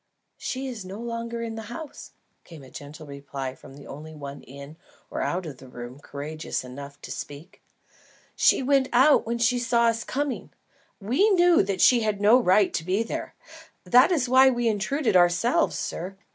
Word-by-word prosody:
"She 265 Hz, +1 st, -4 dB
is 235 Hz, -6 st, -6 dB
no 190 Hz, +3 st, -8 dB
longer 235 Hz, 0 st, -4 dB
in 230 Hz, -1 st, -4 dB
the 225 Hz, -, -6 dB
house," 285 Hz, +5 st, -9 dB, 0.3 s
came 160 Hz, -5 st, -13 dB
in 130 Hz, -, -15 dB
gentle 145 Hz, +3 st, -10 dB
reply 140 Hz, -2 st, -6 dB
from 135 Hz, 0 st, -15 dB
the 140 Hz, -, -13 dB
only 155 Hz, +3 st, -10 dB
one 140 Hz, -1 st, -8 dB
in 140 Hz, +3 st, -11 dB, 0.4 s
or -, -, -3 dB
out 180 Hz, 0 st, -2 dB
of 145 Hz, -5 st, -8 dB
the 130 Hz, -, -13 dB
room 125 Hz, +1 st, -9 dB
courageous 145 Hz, +2 st, -5 dB
enough 140 Hz, +2 st, -10 dB
to -, -, -9 dB
speak. 145 Hz, +6 st, -9 dB, 0.7 s
"She -, -, +3 dB
went 270 Hz, 0 st, +2 dB
out 265 Hz, +1 st, +5 dB
when 235 Hz, +1 st, -1 dB
she 240 Hz, +1 st, +2 dB
saw 235 Hz, -1 st, +2 dB
us 230 Hz, 0 st, -2 dB
coming. 280 Hz, 0 st, -3 dB, 0.5 s
We 255 Hz, -, +2 dB
knew 350 Hz, -3 st, +5 dB
that 195 Hz, -1 st, -2 dB
she 245 Hz, -, +6 dB
had 215 Hz, -3 st, -1 dB
no 215 Hz, +5 st, +6 dB
right 200 Hz, -3 st, +3 dB
to 160 Hz, -, -2 dB
be 190 Hz, +6 st, 0 dB
here. 230 Hz, -, -6 dB, 0.5 s
That 250 Hz, +8 st, +5 dB
is 285 Hz, -8 st, +1 dB
why 260 Hz, +1 st, +6 dB
we 240 Hz, -2 st, 0 dB
intruded 225 Hz, +4 st, 0 dB
ourselves, 175 Hz, +6 st, +3 dB
sir. 185 Hz, +3 st, -5 dB
205 Hz, 185 wpm, -25 LUFS, 145-245 Hz, 0.7 s, she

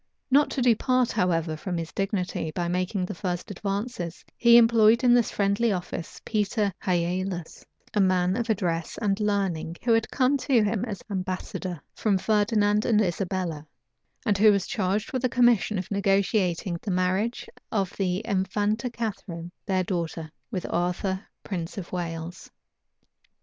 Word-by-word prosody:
Not 290 Hz, +2 st, +5 dB
to 260 Hz, -, -1 dB
depart, 250 Hz, +1 st, +3 dB
however, 165 Hz, -3 st, 0 dB
from 175 Hz, +3 st, -4 dB
his 165 Hz, -1 st, -4 dB
dignity, 190 Hz, -4 st, -2 dB
by 175 Hz, +2 st, -2 dB
making 185 Hz, +2 st, -1 dB
the -, -, -5 dB
first 180 Hz, +2 st, -4 dB
advances, 200 Hz, -2 st, -4 dB
he 235 Hz, 0 st, +7 dB
employed 230 Hz, 0 st, +5 dB
in 245 Hz, -1 st, +6 dB
this 240 Hz, -3 st, +4 dB
friendly 200 Hz, +3 st, +1 dB
office 175 Hz, -3 st, -5 dB
Peter 210 Hz, -1 st, 0 dB
Hialas, 180 Hz, -1 st, -2 dB, 0.3 s
a 210 Hz, -, +3 dB
man 185 Hz, -1 st, +2 dB
of 235 Hz, 0 st, -2 dB
address 175 Hz, -6 st, -1 dB
and 200 Hz, -2 st, 0 dB
learning, 195 Hz, -6 st, -1 dB
who 235 Hz, -, +3 dB
had 225 Hz, -1 st, +2 dB
come 265 Hz, +1 st, +2 dB
to 255 Hz, -4 st, +2 dB
him 210 Hz, 0 st, 0 dB
as 205 Hz, -6 st, -6 dB
ambassador 185 Hz, -2 st, -4 dB
from 205 Hz, -3 st, +1 dB
Ferdinand 210 Hz, +1 st, +2 dB
and 220 Hz, -3 st, +3 dB
Isabella, 180 Hz, -5 st, -2 dB, 0.6 s
and 205 Hz, -4 st, +2 dB
who 215 Hz, 0 st, +7 dB
was 200 Hz, -2 st, +1 dB
charged 210 Hz, +7 st, -1 dB
with 255 Hz, -1 st, -1 dB
a 255 Hz, -, +3 dB
commission 235 Hz, -4 st, +3 dB
of 185 Hz, +1 st, -5 dB
negotiating 195 Hz, -3 st, +1 dB
the -, -, -5 dB
marriage 185 Hz, +5 st, 0 dB, 0.2 s
of 195 Hz, -4 st, -1 dB
the 185 Hz, +1 st, 0 dB
Infanta 205 Hz, +3 st, 0 dB
Catharine, 195 Hz, -7 st, -5 dB, 0.2 s
their 190 Hz, -2 st, +1 dB
daughter, 165 Hz, -3 st, -3 dB, 0.2 s
with 190 Hz, -6 st, -3 dB
Arthur, 185 Hz, +3 st, -1 dB, 0.2 s
prince 175 Hz, -3 st, -5 dB
of 185 Hz, -3 st, -6 dB
Wales. 170 Hz, -1 st, -5 dB
195 Hz, 150 wpm, -26 LUFS, 180-220 Hz, 0.6 s, he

